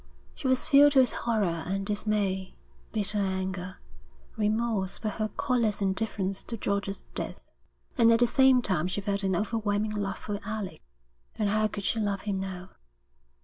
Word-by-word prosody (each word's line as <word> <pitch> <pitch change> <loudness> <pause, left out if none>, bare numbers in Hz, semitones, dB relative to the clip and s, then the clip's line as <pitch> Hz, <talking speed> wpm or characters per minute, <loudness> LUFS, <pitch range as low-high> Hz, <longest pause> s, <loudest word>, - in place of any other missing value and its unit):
She - - -4
was 260 0 +3
filled 290 -1 +6
with 260 -2 +5
horror 200 -8 -1
and 195 +1 -2
dismay, 205 -2 -1 0.4
bitter 210 -1 +1
anger, 190 -1 -2 0.6
remorse 215 -2 0
for 215 - -3
her 215 +1 -2
callous 235 -6 +1
indifference 195 -1 -1
to 230 - -4
George's 200 -1 -2
death; - - -1 0.5
and 230 -1 +7
at 230 - +4
the 240 - +6
same 260 0 +4
time 180 -5 +1
she 185 - -2
felt 200 0 -1
an 190 -2 0
overwhelming 210 +1 -1
love 200 -2 -2
for 205 -1 -5
Alec. 215 -2 -5 0.5
And 210 -2 0
how 215 +1 +2
could 200 -1 -6
she 225 - 0
love 200 -2 -1
him 200 -2 -2
now? 190 -1 -6
205 Hz, 160 wpm, -28 LUFS, 195-225 Hz, 0.6 s, and